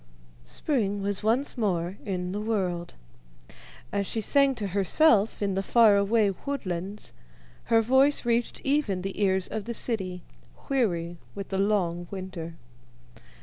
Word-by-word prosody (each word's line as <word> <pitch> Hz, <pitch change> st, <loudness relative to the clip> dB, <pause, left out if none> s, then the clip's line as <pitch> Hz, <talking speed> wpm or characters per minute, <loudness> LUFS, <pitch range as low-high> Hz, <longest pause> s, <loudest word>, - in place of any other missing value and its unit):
Spring 205 Hz, -, -1 dB
was 200 Hz, -1 st, -1 dB
once 230 Hz, +6 st, +1 dB
more 185 Hz, -5 st, -1 dB
in 180 Hz, -2 st, -2 dB
the 205 Hz, +2 st, -3 dB
world. 185 Hz, -6 st, -2 dB, 1.0 s
As 200 Hz, -1 st, -1 dB
she 225 Hz, -, -2 dB
sang 275 Hz, +4 st, +3 dB
to 205 Hz, -4 st, -3 dB
herself 205 Hz, -, +3 dB
in 200 Hz, -1 st, 0 dB
the 190 Hz, -, 0 dB
faraway 210 Hz, -1 st, +4 dB
woodlands 200 Hz, -7 st, -4 dB, 0.5 s
her 225 Hz, -1 st, +4 dB
voice 265 Hz, +4 st, +3 dB
reached 235 Hz, 0 st, 0 dB
even 270 Hz, -10 st, 0 dB
the 195 Hz, +2 st, -4 dB
ears 190 Hz, -1 st, +2 dB
of 215 Hz, -2 st, -4 dB
the 235 Hz, 0 st, -4 dB
city, 185 Hz, -8 st, -2 dB, 0.5 s
weary 175 Hz, -10 st, 0 dB, 0.2 s
with 200 Hz, -1 st, -6 dB
the 195 Hz, -, -1 dB
long 180 Hz, -4 st, +1 dB
winter. 185 Hz, -4 st, -6 dB
200 Hz, 135 wpm, -27 LUFS, 185-230 Hz, 1.0 s, faraway